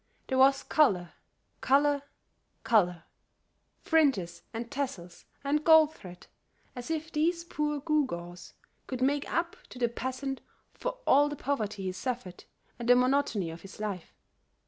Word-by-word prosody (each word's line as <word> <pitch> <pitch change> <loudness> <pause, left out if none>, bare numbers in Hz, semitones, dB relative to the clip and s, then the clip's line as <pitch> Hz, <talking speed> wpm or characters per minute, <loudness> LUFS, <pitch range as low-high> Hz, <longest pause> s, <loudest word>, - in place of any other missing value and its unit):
There 260 - +1
was 270 +1 +5
color, 185 - +2 0.6
color, 285 +1 +4 0.6
color; 180 -7 +2 0.8
fringes 205 - +2
and 230 +2 -6
tassels 250 -12 -5 0.2
and 295 +2 +1
gold 315 -1 +6
thread, 180 -2 -12 0.5
as 245 +2 -7
if 320 0 -3
these 335 +2 +1
poor 300 -3 -2
gewgaws 180 - -2 0.3
could 255 -1 -3
make 285 +2 0
up 335 0 -1
to - - -11
the 245 -1 +2
peasant 260 +3 -4 0.3
for - - -4
all 290 +2 +5
the 295 - -4
poverty 215 -8 -2
he 185 - -1
suffered 210 -2 -5 0.3
and 240 0 -3
the 245 - +8
monotony 250 -8 +1
of 165 +1 -10
his 195 +3 -12
life. 200 -5 -5
260 Hz, 140 wpm, -29 LUFS, 195-295 Hz, 0.8 s, the